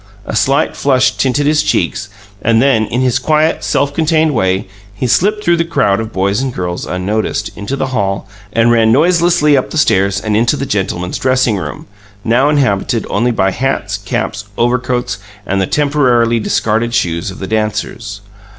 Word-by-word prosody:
A - - -4
slight 135 +5 +1
flush 130 -2 +2
tinted 135 +2 0
his 150 0 +3
cheeks, 105 -7 -1 0.3
and 115 +1 +2
then, 115 -4 +2
in 125 - -1
his 130 0 +1
quiet, 155 +4 +1
self 140 0 0
contained 160 0 +2
way, 95 -4 0 0.3
he 125 - -3
slipped 210 - +1
through 170 0 +3
the 170 - +1
crowd 100 -12 +1
of 110 0 -5
girls 100 +3 0
and 135 -1 -2
boys, 90 -1 -3
unnoticed, 100 +4 -2
into 100 +7 -4
the 135 -1 -2
hall, 100 -3 -1 0.2
and 115 +2 +3
ran 115 -1 +4
noiselessly 170 +1 +3
up 130 - 0
the - - -5
stairs 100 -8 +2
and 110 -1 -2
into 120 +6 +2
the 140 - -3
"gentlemen's 90 -5 -2
dressing 130 -4 +1
room", 75 -5 -6 0.4
now 125 +5 +2
inhabited 120 -6 0
only 115 +5 +1
by 95 -5 +1
hats, 110 -4 -2
caps, 100 0 -3
overcoats, 125 -2 0 0.3
and 95 0 0
the 95 - 0
temporarily 125 -6 +2
discarded 115 +2 0
shoes 85 -5 -1
of 95 - -9
the 95 - -5
dancers. 105 0 -3
115 Hz, 175 wpm, -14 LUFS, 100-140 Hz, 0.4 s, ran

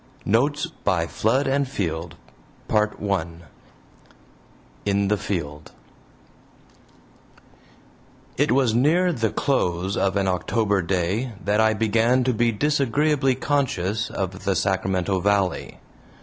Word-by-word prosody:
NOTES 140 - +1 0.2
BY 90 -4 +1
FLOOD 115 +10 0
AND 140 +1 +1
FIELD 85 -7 -3 0.5
PART 105 -1 +1
I 100 -5 0 1.6
IN 100 -1 +1
THE 105 - +2
FIELD 75 -8 -5 2.6
It 145 +2 +1
was 130 -4 +3
near 165 +9 +3
the 115 -5 0
close 95 -8 -1
of 95 0 0
an 100 -1 +1
October 100 +2 0
day 95 +7 -1
that 105 +2 +2
I 110 0 +3
began 115 +4 +2
to 130 0 +1
be 120 +1 +2
disagreeably 140 +2 +1
conscious 115 -7 -1
of 95 0 -4
the 100 - 0
Sacramento 95 +1 0
Valley. 100 -1 0
105 Hz, 110 wpm, -23 LUFS, 95-130 Hz, 2.6 s, was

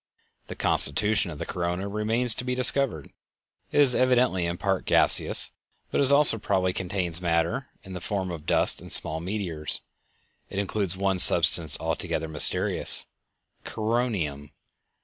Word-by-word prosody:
The - - -9
constitution 105 +7 +2
of 75 - -9
the - - -7
corona 90 +2 -5
remains 110 +4 +1
to 115 - -6
be 125 0 -4
discovered. 125 - +3 0.6
It - - -1
is 135 -3 +4
evidently 125 -9 0
in 85 0 -5
part 95 -2 -3
gaseous, - - +2 0.4
but - - -1
it 140 0 +3
also 140 -6 +5
probably 95 -3 -2
contains 90 -3 -4
matter 85 +8 -2 0.2
in 95 - -12
the 90 - -8
form 95 -1 -5
of 80 -2 -10
dust - - +3
and - - -12
small 80 +1 +4
meteors. 85 -4 -4 0.7
It - - -9
includes 100 -2 -4
one 95 -1 -2
substance 80 -3 +5
altogether 80 - -4
mysterious—"coronium." 90 - -3
95 Hz, 140 wpm, -24 LUFS, 85-110 Hz, 0.7 s, also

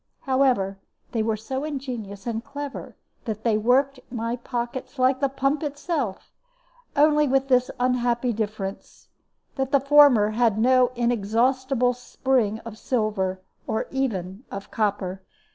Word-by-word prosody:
However, 255 -8 +1 0.3
they 225 - 0
were 220 0 0
so 265 +6 -4
ingenious 245 -9 -5
and 230 -1 -3
clever 285 +1 -7 0.3
that 220 -2 -4
they 230 -2 +2
worked 255 +5 +2
my 230 -1 -2
pockets 240 +2 -5
like 260 +1 +3
the 275 -1 +1
pump 275 +2 0
itself, 290 - -3 0.6
only 300 0 +4
with 270 +1 +1
this 255 -1 +3
unhappy 245 -1 +1
difference, 205 -2 -5 0.5
that 265 0 -1
the 280 - +5
former 275 -6 +6
had 225 -2 +2
no 250 +2 +4
inexhaustible 245 +3 +1
spring 245 -3 0
of 225 -1 -8
silver, 205 -6 -1 0.3
or 220 - -1
even 210 -6 -2
of 195 0 -7
copper. 195 -3 -1
245 Hz, 130 wpm, -24 LUFS, 215-270 Hz, 0.6 s, former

